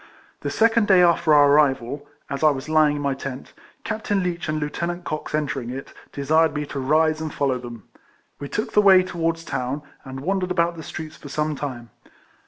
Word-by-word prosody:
The -, -, -3 dB
second 225 Hz, -1 st, +3 dB
day 185 Hz, -2 st, +6 dB
after 170 Hz, -2 st, +3 dB
our 145 Hz, -1 st, +7 dB
arrival, 140 Hz, -1 st, +2 dB, 0.2 s
as 140 Hz, +2 st, -4 dB
I 155 Hz, -, +7 dB
was 140 Hz, -1 st, -3 dB
lying 155 Hz, -1 st, +3 dB
in 145 Hz, -, -4 dB
my 140 Hz, -1 st, +1 dB
tent, 135 Hz, 0 st, -7 dB, 0.3 s
Captain 210 Hz, -3 st, -1 dB
Leech 175 Hz, -2 st, -3 dB
and 155 Hz, 0 st, -1 dB
Lieutenant 170 Hz, +4 st, -3 dB
Cox 155 Hz, -2 st, -4 dB
entering 135 Hz, -5 st, -2 dB
it, 135 Hz, +2 st, -7 dB, 0.2 s
desired 155 Hz, +3 st, +2 dB
me 150 Hz, 0 st, -2 dB
to 140 Hz, -, -6 dB
rise 155 Hz, +3 st, +2 dB
and 155 Hz, -1 st, -4 dB
follow 135 Hz, -3 st, 0 dB
them. 120 Hz, -3 st, -9 dB, 0.6 s
We 140 Hz, -, -6 dB
took 215 Hz, -, -3 dB
the 210 Hz, -, +5 dB
way 190 Hz, -2 st, +7 dB
towards 165 Hz, -2 st, -2 dB
the -, -, -10 dB
town, 130 Hz, +4 st, -2 dB, 0.2 s
and 135 Hz, -1 st, -8 dB
wandered 185 Hz, +3 st, -1 dB
about 170 Hz, -1 st, +1 dB
the 160 Hz, -, -8 dB
streets 155 Hz, 0 st, -8 dB
for 145 Hz, -, -11 dB
some 150 Hz, +1 st, -1 dB
time. 125 Hz, -5 st, -6 dB
155 Hz, 200 wpm, -23 LUFS, 140-170 Hz, 0.6 s, our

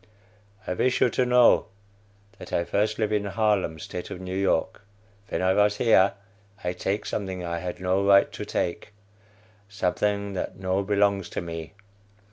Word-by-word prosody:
I -, -, -2 dB
wish 125 Hz, +7 st, +1 dB
you 120 Hz, -, +3 dB
to 125 Hz, -, +1 dB
know 125 Hz, -1 st, +5 dB, 0.7 s
that -, -, -10 dB
I 85 Hz, -, +1 dB
first 105 Hz, +4 st, 0 dB
live 110 Hz, -2 st, 0 dB
in 105 Hz, -1 st, 0 dB
Harlem, 100 Hz, -5 st, 0 dB
State 90 Hz, +3 st, -7 dB
of -, -, -7 dB
New 95 Hz, 0 st, -5 dB
York. 95 Hz, -1 st, 0 dB, 0.5 s
Ven -, -, -2 dB
I 95 Hz, 0 st, +3 dB
vos 105 Hz, +1 st, +3 dB
here, 100 Hz, -4 st, +4 dB, 0.5 s
I 90 Hz, 0 st, -1 dB
take 95 Hz, +3 st, -2 dB
something 95 Hz, -3 st, -4 dB
I 85 Hz, 0 st, -3 dB
had 90 Hz, 0 st, -5 dB
no 95 Hz, +2 st, +1 dB
right 100 Hz, 0 st, +5 dB
to -, -, -6 dB
take, 95 Hz, +4 st, -3 dB, 0.8 s
something 100 Hz, +1 st, -1 dB
that 95 Hz, -, -4 dB
no 95 Hz, +1 st, 0 dB
belongs 100 Hz, -1 st, +1 dB
to -, -, -4 dB
me. 80 Hz, -2 st, -7 dB
100 Hz, 165 wpm, -26 LUFS, 90-105 Hz, 0.8 s, know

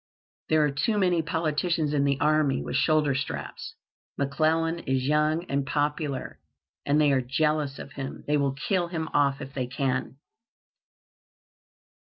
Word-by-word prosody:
There 155 Hz, -1 st, +4 dB
are 145 Hz, -, 0 dB
too 210 Hz, +10 st, 0 dB
many 180 Hz, -4 st, +3 dB
politicians 160 Hz, -1 st, 0 dB
in 140 Hz, -1 st, +2 dB
the 140 Hz, -1 st, +1 dB
army 150 Hz, -2 st, +2 dB
with -, -, -4 dB
shoulder 155 Hz, -3 st, +3 dB
straps. 135 Hz, -1 st, -5 dB, 0.4 s
McClellan 160 Hz, +4 st, +1 dB
is 130 Hz, -4 st, -1 dB
young 150 Hz, +3 st, +2 dB
and 140 Hz, -4 st, -1 dB
popular, 145 Hz, 0 st, -2 dB, 0.5 s
and 145 Hz, +2 st, +3 dB
they 150 Hz, -2 st, +4 dB
are 135 Hz, -1 st, +3 dB
jealous 145 Hz, +2 st, 0 dB
of 140 Hz, -, -9 dB
him. 135 Hz, -1 st, -6 dB
They 150 Hz, -, +1 dB
will 140 Hz, -2 st, +1 dB
kill 175 Hz, +5 st, 0 dB
him 160 Hz, -2 st, -4 dB
off 140 Hz, -1 st, +2 dB
if 135 Hz, +1 st, -8 dB
they 130 Hz, -3 st, -2 dB
can." 130 Hz, 0 st, -2 dB
150 Hz, 150 wpm, -27 LUFS, 140-155 Hz, 0.5 s, There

